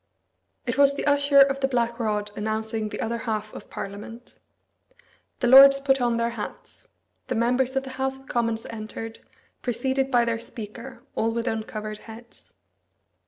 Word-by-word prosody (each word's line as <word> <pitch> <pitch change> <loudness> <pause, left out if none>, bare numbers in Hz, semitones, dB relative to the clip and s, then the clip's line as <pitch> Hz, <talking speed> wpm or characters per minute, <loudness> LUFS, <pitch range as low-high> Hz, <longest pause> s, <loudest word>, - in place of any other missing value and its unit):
It - - -2
was 280 0 +6
the - - -3
Usher 285 -1 +5
of 275 0 +4
the 270 - +1
Black 235 -2 -1
Rod 210 -2 -1
announcing 220 0 -2
the - - -6
other 235 +1 -2
half 215 -2 -3
of - - -10
Parliament. 210 +4 -8 1.0
The 245 - +2
lords 275 +2 +9
put 270 -1 +2
on 240 -1 +1
their 235 0 0
hats. 225 -3 -8 0.4
The 255 - -2
members 250 +3 +1
of 270 - +1
the 265 - -8
House 265 0 0
of 270 - -19
Commons 230 -2 -1
entered, 225 0 -7 0.4
preceded 265 +3 -1
by 240 -3 +3
their 230 -1 -1
Speaker, 230 0 -9
all 225 - 0
with 230 +1 -2
uncovered 215 -1 -4
heads. 230 +1 -14
235 Hz, 165 wpm, -25 LUFS, 220-265 Hz, 1.0 s, lords